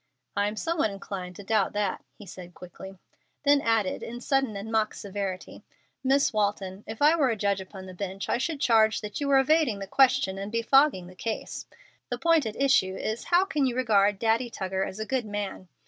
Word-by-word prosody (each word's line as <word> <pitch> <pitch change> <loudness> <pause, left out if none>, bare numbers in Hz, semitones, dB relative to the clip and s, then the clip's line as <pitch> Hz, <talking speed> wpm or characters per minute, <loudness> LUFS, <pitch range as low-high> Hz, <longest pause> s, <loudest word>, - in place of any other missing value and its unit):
"I 200 0 +1
am 210 - -4
somewhat 325 -1 0
inclined 195 -2 -7
to 205 - -10
doubt 205 -1 +1
that," 205 -2 -2
he 205 - -12
said, 180 -1 -11
quickly; 190 +2 -11 0.5
then 285 -1 +4
added, 225 -6 0
in 240 +1 -6
sudden 270 -3 0
and 210 +3 -6
mock 220 -1 +1
severity, 195 -2 -6 0.4
"Miss 270 0 +2
Walton, 200 -2 -1
if 225 +5 -4
I 305 +3 +6
were 285 -6 +2
a 230 - 0
judge 200 -2 0
upon 190 0 -10
the 185 - -9
bench 195 +1 -5
I - - 0
should 315 +2 -2
charge 220 -5 +3
that 210 +5 -6
you 285 - -1
were 275 -1 +5
evading 270 -4 +3
the 195 - -6
question 195 -4 +3
and 200 +1 -5
befogging 230 -2 +3
the 180 - -12
case. 220 +4 -5 0.4
The - - -2
point 330 -6 +3
at 215 - -5
issue 260 -9 +3
is, 220 +4 -4
How 355 +2 +3
can 295 -8 0
you 245 - -2
regard 205 -5 +3
Daddy 230 +3 +1
Tuggar 190 -3 -2
as 190 - -8
a 220 - -3
good 250 -1 -2
man? 205 -2 -5
215 Hz, 210 wpm, -27 LUFS, 195-260 Hz, 0.5 s, I